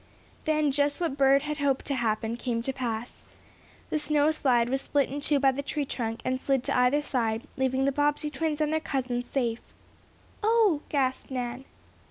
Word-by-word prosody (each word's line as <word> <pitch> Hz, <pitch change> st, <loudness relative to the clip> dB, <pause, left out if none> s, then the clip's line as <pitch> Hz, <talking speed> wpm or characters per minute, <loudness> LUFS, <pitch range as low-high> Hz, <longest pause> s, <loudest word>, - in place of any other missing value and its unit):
Then 305 Hz, -2 st, +2 dB
just 285 Hz, +1 st, +1 dB
what 335 Hz, -6 st, -1 dB
Bert 275 Hz, 0 st, +4 dB
had 300 Hz, 0 st, -3 dB
hoped 275 Hz, -2 st, 0 dB
would 275 Hz, -, -1 dB
happen 225 Hz, -1 st, -1 dB
came 235 Hz, -1 st, -2 dB
to 270 Hz, -, -2 dB
pass. 240 Hz, -2 st, -4 dB, 0.7 s
The 310 Hz, -, +1 dB
snow 300 Hz, 0 st, +2 dB
slide 250 Hz, -6 st, +2 dB
was 265 Hz, +2 st, 0 dB
split 285 Hz, -2 st, +1 dB
in 285 Hz, +2 st, -4 dB
two 290 Hz, 0 st, +2 dB
by 270 Hz, -1 st, +4 dB
the 270 Hz, +2 st, -3 dB
tree 285 Hz, +1 st, -2 dB
trunk, 225 Hz, -3 st, -3 dB
and 255 Hz, 0 st, -1 dB
slid 270 Hz, -2 st, +1 dB
to -, -, 0 dB
either 250 Hz, +4 st, +3 dB
side, 225 Hz, -5 st, -1 dB
leaving 265 Hz, 0 st, +1 dB
the 275 Hz, -, +3 dB
Bobbsey 295 Hz, +1 st, 0 dB
twins 310 Hz, -1 st, -2 dB
and 305 Hz, 0 st, +1 dB
their 315 Hz, -, +2 dB
cousins 250 Hz, -5 st, -2 dB
safe. 235 Hz, -4 st, -1 dB, 0.8 s
"Oh!" 430 Hz, -8 st, +3 dB
gasped 265 Hz, -3 st, 0 dB
Nan. 250 Hz, 0 st, -4 dB
270 Hz, 190 wpm, -28 LUFS, 250-295 Hz, 0.8 s, Bert